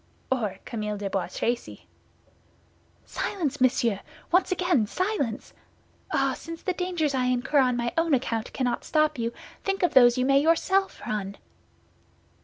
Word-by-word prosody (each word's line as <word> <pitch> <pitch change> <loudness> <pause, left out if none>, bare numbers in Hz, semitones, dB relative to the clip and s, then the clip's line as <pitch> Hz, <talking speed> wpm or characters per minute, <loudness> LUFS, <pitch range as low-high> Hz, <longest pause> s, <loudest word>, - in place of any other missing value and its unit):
"Or 225 -7 0
Camille 210 -3 -3
de 200 -1 -4
Bois 195 -3 -1
Tracy." 235 +6 -3 1.2
"Silence, 295 -9 -3
monsieur! 240 -5 +2 0.3
Once 360 +2 +3
again, 350 - +2
silence! 365 - -2 0.6
Ah, 270 -1 +2
since 330 0 -9
the 370 - 0
dangers 350 -5 -1
I 255 -1 +1
incur 250 +3 +2
on 250 -2 +3
my 240 0 -1
own 330 -3 +3
account 230 -3 -2
cannot 245 -2 -1
stop 305 -3 +1
you, 230 0 -1 0.3
think 390 -1 -1
of 355 - +2
those 245 -1 +7
you 255 - +2
may 275 +1 +4
yourself 380 +5 +2
run!" 200 -2 -3
265 Hz, 145 wpm, -26 LUFS, 235-330 Hz, 1.2 s, those